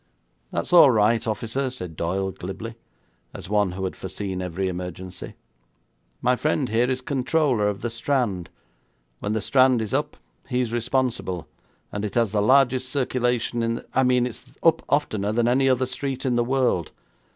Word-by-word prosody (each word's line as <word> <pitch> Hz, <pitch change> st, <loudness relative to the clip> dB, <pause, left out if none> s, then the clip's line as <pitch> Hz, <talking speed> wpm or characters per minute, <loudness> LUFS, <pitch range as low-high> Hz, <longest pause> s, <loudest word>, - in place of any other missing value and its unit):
'That's -, -, -2 dB
all 170 Hz, -5 st, +9 dB
right, 115 Hz, 0 st, +3 dB
officer,' 120 Hz, +5 st, -1 dB
said 90 Hz, -10 st, -8 dB
Doyle 95 Hz, +4 st, -1 dB
glibly, 95 Hz, +6 st, -7 dB, 0.6 s
as -, -, -8 dB
one 105 Hz, -3 st, +2 dB
who 95 Hz, +1 st, -5 dB
had 95 Hz, -, -3 dB
foreseen 95 Hz, 0 st, -5 dB
every 90 Hz, +1 st, -2 dB
emergency. 90 Hz, 0 st, -6 dB, 0.9 s
'My 125 Hz, +1 st, +4 dB
friend 135 Hz, +1 st, 0 dB
here 120 Hz, +3 st, +2 dB
is 130 Hz, 0 st, -1 dB
controller 135 Hz, -4 st, +1 dB
of 100 Hz, -1 st, -2 dB
the 120 Hz, -, -2 dB
Strand. 115 Hz, -7 st, -1 dB, 0.7 s
When 105 Hz, -, -2 dB
the 110 Hz, -, 0 dB
Strand 130 Hz, +2 st, +4 dB
is 110 Hz, -2 st, -3 dB
up -, -, -1 dB, 0.3 s
he 125 Hz, -, 0 dB
is 120 Hz, -2 st, -1 dB
responsible, 120 Hz, -7 st, -1 dB, 0.4 s
and 100 Hz, -, -4 dB
it 105 Hz, -2 st, -4 dB
has 115 Hz, -4 st, +2 dB
the 105 Hz, -1 st, +1 dB
largest 130 Hz, +2 st, +4 dB
circulation 125 Hz, -3 st, 0 dB
in 115 Hz, 0 st, 0 dB
the -, -, -8 dB
I 130 Hz, -, +3 dB
mean 125 Hz, -1 st, +3 dB
it's 125 Hz, -, -7 dB, 0.2 s
up 165 Hz, -1 st, +4 dB
oftener 110 Hz, -8 st, +1 dB
than 115 Hz, +1 st, +1 dB
any 135 Hz, +2 st, +3 dB
other 130 Hz, 0 st, +2 dB
street 130 Hz, +1 st, -4 dB
in 125 Hz, -2 st, +1 dB
the 120 Hz, -, +3 dB
world. 125 Hz, -10 st, +1 dB
120 Hz, 175 wpm, -24 LUFS, 100-130 Hz, 0.9 s, all